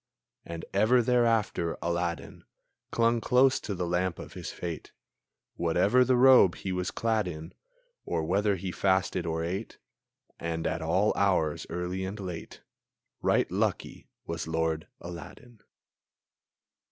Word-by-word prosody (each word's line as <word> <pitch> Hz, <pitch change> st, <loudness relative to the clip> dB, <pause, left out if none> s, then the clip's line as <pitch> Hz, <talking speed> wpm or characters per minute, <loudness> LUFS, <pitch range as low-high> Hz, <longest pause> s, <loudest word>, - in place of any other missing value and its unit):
And 85 Hz, -1 st, -7 dB
ever 110 Hz, +5 st, +4 dB
thereafter, 115 Hz, -8 st, +1 dB
Aladdin 85 Hz, 0 st, -3 dB, 0.5 s
Clung 115 Hz, 0 st, +2 dB
close 130 Hz, +2 st, +4 dB
to 100 Hz, -, -4 dB
the 90 Hz, -1 st, -2 dB
lamp 90 Hz, 0 st, 0 dB
of -, -, -9 dB
his -, -, -6 dB
fate, 85 Hz, -3 st, -6 dB, 0.6 s
Whatever 90 Hz, +9 st, +3 dB
the 130 Hz, +1 st, +3 dB
robe 125 Hz, -7 st, +7 dB
he 95 Hz, -, -5 dB
was 90 Hz, -1 st, -1 dB
clad 110 Hz, -4 st, 0 dB
in, 80 Hz, 0 st, -7 dB, 0.5 s
Or 80 Hz, -, -2 dB
whether 100 Hz, +5 st, +1 dB
he 95 Hz, 0 st, -4 dB
fasted 95 Hz, -2 st, +1 dB
or 80 Hz, 0 st, -1 dB
ate; 95 Hz, +6 st, -4 dB, 0.6 s
And 80 Hz, -1 st, -3 dB
at -, -, -1 dB
all 90 Hz, +6 st, +2 dB
hours, 90 Hz, -6 st, +1 dB
early 90 Hz, +2 st, -3 dB
and 95 Hz, +3 st, -5 dB
late! 90 Hz, -4 st, -7 dB, 0.6 s
Right -, -, +2 dB
lucky -, -, -2 dB, 0.2 s
was 85 Hz, -1 st, -4 dB
Lord 80 Hz, -1 st, -1 dB
Aladdin! 90 Hz, -, -10 dB
90 Hz, 130 wpm, -28 LUFS, 85-110 Hz, 0.6 s, robe